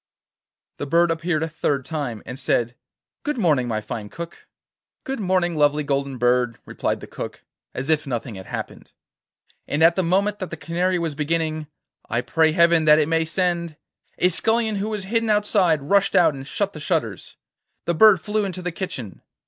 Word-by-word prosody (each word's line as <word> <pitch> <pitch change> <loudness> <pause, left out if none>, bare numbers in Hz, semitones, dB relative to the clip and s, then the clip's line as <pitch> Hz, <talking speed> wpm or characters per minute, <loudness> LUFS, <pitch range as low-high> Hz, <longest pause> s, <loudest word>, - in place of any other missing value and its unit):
The 145 - -4
bird 170 +3 +3
appeared 165 -1 -1
a - - -1
third 145 -4 -1
time, 140 -8 -4
and 130 +1 -7
said: 120 -2 0 0.5
'Good 295 -2 -2
morning, 150 - +2
my 110 -2 -1
fine 105 0 -6
Cook.' 170 +5 -9 0.6
'Good 270 -1 -4
morning, 185 -3 +1
lovely 150 0 +3
Golden 140 -2 -1
Bird,' 125 -1 +2
replied - - -2
the - - -7
Cook, - - -7 0.3
as 130 +2 -4
if 155 -2 +1
nothing 120 -2 -3
had 95 -1 -9
happened, - - -7 0.7
and 150 +2 +1
at 170 +1 +6
the 190 - +2
moment 195 +4 +1
that 185 - -4
the 170 - -6
Canary 175 +4 0
was 165 -3 -2
beginning, 155 +1 -1 0.4
'I 120 - 0
pray 160 +4 +2
Heaven 170 0 +4
that 150 0 +7
it 155 0 +2
may 165 0 +2
send,' 170 -1 -1 0.4
a 180 - +4
scullion 220 +3 +1
who 205 +2 -2
was 210 -3 -3
hidden 225 +3 0
outside 200 -7 +3
rushed 200 +7 +2
out 170 - +5
and 135 0 -8
shut 200 +3 -2
the 155 - -8
shutters. 150 - -2 0.5
The 170 - +1
bird 205 +2 +7
flew 210 +3 -1
into 185 -2 -4
the 180 - -2
kitchen. 160 - -6
165 Hz, 185 wpm, -23 LUFS, 140-185 Hz, 0.7 s, that